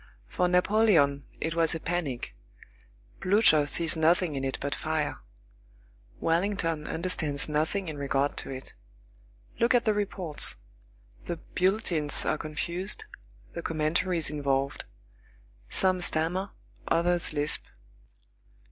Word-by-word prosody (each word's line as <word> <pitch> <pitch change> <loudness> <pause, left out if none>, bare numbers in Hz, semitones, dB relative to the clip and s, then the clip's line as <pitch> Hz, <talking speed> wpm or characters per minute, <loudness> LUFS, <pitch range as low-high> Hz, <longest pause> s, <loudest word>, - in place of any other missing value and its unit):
For 180 - 0
Napoleon 180 -7 +3
it 160 - -2
was 165 -1 +4
a - - -3
panic;10 - - -7
Blücher 155 -8 +5
sees 165 +1 +1
nothing 160 0 +2
in 135 - -3
it 135 0 -2
but 140 +1 -2
fire; 155 -1 -2 1.0
Wellington 165 -2 0
understands 160 -5 -1
nothing 155 +6 -1
in 155 -2 -5
regard 140 0 0
to - - -4
it. 130 0 -7 0.9
Look 235 +2 +4
at 240 - +3
the 215 - +3
reports. 190 -6 -2 0.7
The 170 - -3
bulletins 180 -5 0
are - - 0
confused, 170 +5 -3 0.5
the - - -4
commentaries 165 +1 0
involved. 140 -2 -1 0.8
Some 185 -1 +2
stammer, 175 +4 0 0.4
others 175 +1 +2
lisp. 150 0 +3
160 Hz, 110 wpm, -28 LUFS, 145-180 Hz, 1.0 s, Blücher